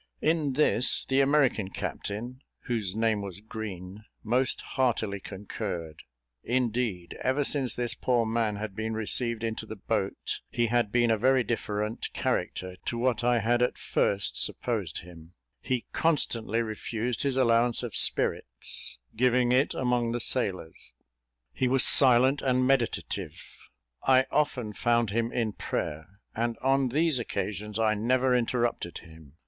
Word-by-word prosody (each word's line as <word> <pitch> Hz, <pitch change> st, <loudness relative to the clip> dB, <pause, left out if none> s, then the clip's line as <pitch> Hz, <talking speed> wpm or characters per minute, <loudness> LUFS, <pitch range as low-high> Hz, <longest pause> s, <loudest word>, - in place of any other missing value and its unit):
In 155 Hz, -3 st, 0 dB
this, 130 Hz, -3 st, +2 dB
the 135 Hz, +1 st, +3 dB
American 135 Hz, -8 st, +2 dB
captain, 120 Hz, +7 st, -5 dB, 0.2 s
whose 110 Hz, -7 st, -2 dB
name 110 Hz, -2 st, +1 dB
was 100 Hz, -1 st, -7 dB
Green, 105 Hz, -2 st, -8 dB, 0.2 s
most 125 Hz, +3 st, +2 dB
heartily 115 Hz, -6 st, -1 dB
concurred. 95 Hz, -5 st, -6 dB, 0.4 s
Indeed, 115 Hz, -7 st, -2 dB
ever 135 Hz, +3 st, +1 dB
since 135 Hz, -3 st, +2 dB
this 120 Hz, -1 st, -1 dB
poor 120 Hz, -2 st, 0 dB
man 110 Hz, -1 st, -1 dB
had 105 Hz, -1 st, -6 dB
been 110 Hz, +1 st, -3 dB
received 115 Hz, +1 st, +1 dB
into 110 Hz, -1 st, -4 dB
the 110 Hz, -, -7 dB
boat, 100 Hz, -1 st, -3 dB
he 120 Hz, -, 0 dB
had 115 Hz, -2 st, 0 dB
been 120 Hz, 0 st, +2 dB
a 110 Hz, -, +1 dB
very 130 Hz, +1 st, +3 dB
different 105 Hz, -1 st, -3 dB
character 90 Hz, 0 st, -2 dB
to 120 Hz, -, -3 dB
what 120 Hz, -1 st, 0 dB
I 120 Hz, -1 st, +2 dB
had 120 Hz, +3 st, +1 dB
at 125 Hz, -, +1 dB
first 100 Hz, 0 st, +1 dB
supposed -, -, -2 dB
him; 85 Hz, 0 st, -14 dB, 0.3 s
he 125 Hz, -2 st, -2 dB
constantly 115 Hz, -8 st, +1 dB
refused 115 Hz, +2 st, -3 dB
his 135 Hz, -2 st, -1 dB
allowance 120 Hz, -2 st, +3 dB
of -, -, -5 dB
spirits, -, -, +2 dB, 0.2 s
giving 125 Hz, +1 st, +2 dB
it 130 Hz, +3 st, +2 dB
among 120 Hz, -2 st, 0 dB
the 120 Hz, -, -2 dB
sailors; 95 Hz, -10 st, -1 dB, 0.6 s
he 130 Hz, -, 0 dB
was 130 Hz, 0 st, +4 dB
silent 130 Hz, +1 st, +6 dB
and 130 Hz, -1 st, +1 dB
meditative; 130 Hz, -3 st, -1 dB, 0.6 s
I 130 Hz, 0 st, +4 dB
often 125 Hz, -7 st, -1 dB
found 120 Hz, 0 st, +1 dB
him 115 Hz, +2 st, -1 dB
in 115 Hz, -3 st, -1 dB
prayer, 80 Hz, +6 st, -5 dB
and 115 Hz, 0 st, -2 dB
on 135 Hz, 0 st, +1 dB
these 155 Hz, +1 st, +1 dB
occasions 105 Hz, -2 st, -4 dB
I 110 Hz, -1 st, +2 dB
never 125 Hz, +4 st, +1 dB
interrupted 120 Hz, -7 st, -1 dB
him. 80 Hz, -4 st, -15 dB
115 Hz, 145 wpm, -27 LUFS, 105-125 Hz, 0.6 s, silent